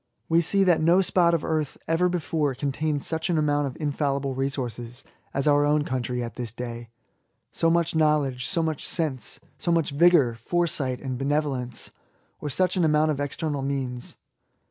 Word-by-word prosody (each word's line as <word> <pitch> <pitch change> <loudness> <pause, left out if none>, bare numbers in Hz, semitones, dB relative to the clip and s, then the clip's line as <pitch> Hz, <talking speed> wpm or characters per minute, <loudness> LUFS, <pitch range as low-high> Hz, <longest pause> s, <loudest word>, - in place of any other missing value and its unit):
We 165 +1 +4
see 195 +4 +2
that 175 -4 +3
no 175 +4 +4
spot 170 -1 +3
of 160 - -2
earth 155 -3 -1
ever 165 +2 +2
before 155 -5 -1
contained 145 +2 -2
such 160 +2 -1
an 170 - +2
amount 145 -1 +1
of 130 - -8
infallible 140 -2 -1
resources 125 -3 -3 0.3
as 140 +2 -1
our 145 0 +5
own 150 0 +2
country 125 -2 -2
at 115 -3 -7
this 120 -3 -4
day; 120 0 -7 0.6
so 165 - +1
much 170 -1 +1
knowledge, 145 -5 +1
so 170 -4 +1
much 160 -3 -2
sense, 150 -7 -1 0.2
so 170 - 0
much 165 -4 +1
vigour, 150 -5 +5
foresight, 130 0 -1
and 130 -3 -4
benevolence, 135 -3 -2 0.5
or 150 - -4
such 185 +6 +1
an 180 - +2
amount 155 0 +3
of 145 - -3
external 145 0 -2
means. 135 -3 -4
145 Hz, 170 wpm, -25 LUFS, 130-165 Hz, 0.6 s, our